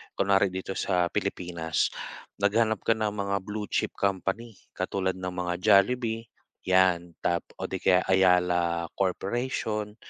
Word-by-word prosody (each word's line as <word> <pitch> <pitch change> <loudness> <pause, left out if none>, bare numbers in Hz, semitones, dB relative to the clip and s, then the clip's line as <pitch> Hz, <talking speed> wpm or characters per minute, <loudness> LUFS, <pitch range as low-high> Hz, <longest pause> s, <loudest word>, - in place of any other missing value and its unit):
Kunwari 100 0 +3
dito 95 +1 -4
sa 90 -2 +1
Pilipinas, 85 -3 -1 0.5
naghanap 110 +2 +2
ka 115 - +6
ng 110 -1 0
mga 100 -1 -2
blue 105 +1 -5
chip - - 0
company, 100 +4 -2 0.2
katulad 95 -1 -1
ng 90 0 -4
mga 90 -1 -2
Jollibee, 115 +2 +3 0.4
yan. 90 -2 +3
Tap 85 0 +2 0.2
o - - -4
'di - - -2
kaya 95 -1 +4
Ayala 90 -2 +3
Corporation. 105 +2 -2
95 Hz, 130 wpm, -27 LUFS, 90-105 Hz, 0.5 s, ka